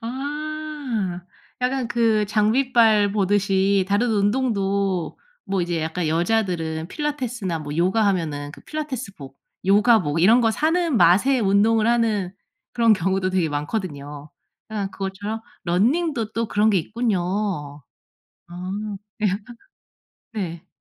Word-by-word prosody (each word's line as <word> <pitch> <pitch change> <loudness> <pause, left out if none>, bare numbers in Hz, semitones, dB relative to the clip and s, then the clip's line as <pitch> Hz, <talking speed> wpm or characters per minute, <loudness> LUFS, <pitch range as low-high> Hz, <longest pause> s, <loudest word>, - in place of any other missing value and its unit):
아 280 -6 -4 0.4
약간 250 -1 -1
그 225 -3 +2
장비빨 220 -1 +3
보듯이 195 -1 +2
다른 220 +4 +2
운동도 200 -4 0 0.3
뭐 195 -2 -1
이제 170 -2 -2
약간 160 +1 -2
여자들은 170 -3 0
필라테스나 250 - -3
뭐 145 0 -6
요가하면은 170 -6 0
그 - - -13
필라테스복 255 - -6 0.3
요가복 200 -6 +4
이런 225 +7 +6
거 225 - +3
사는 320 +2 +1
맛에 220 +11 +4
운동을 215 +2 +3
하는 220 -6 +1 0.4
그런 230 -2 +4
경우도 190 +1 0
되게 180 -4 +1
많거든요. 145 -2 -5 0.4
그냥 205 -3 -3
그것처럼 200 +3 -5 0.2
러닝도 230 - +1
또 230 0 -1
그런 210 +2 +3
게 195 - +3
있군요. 185 - -2 0.7
아 180 +2 -7 0.5
네. 210 - +2 1.0
네. 175 -6 -5
205 Hz, 250 characters per minute, -22 LUFS, 180-230 Hz, 1.0 s, 이런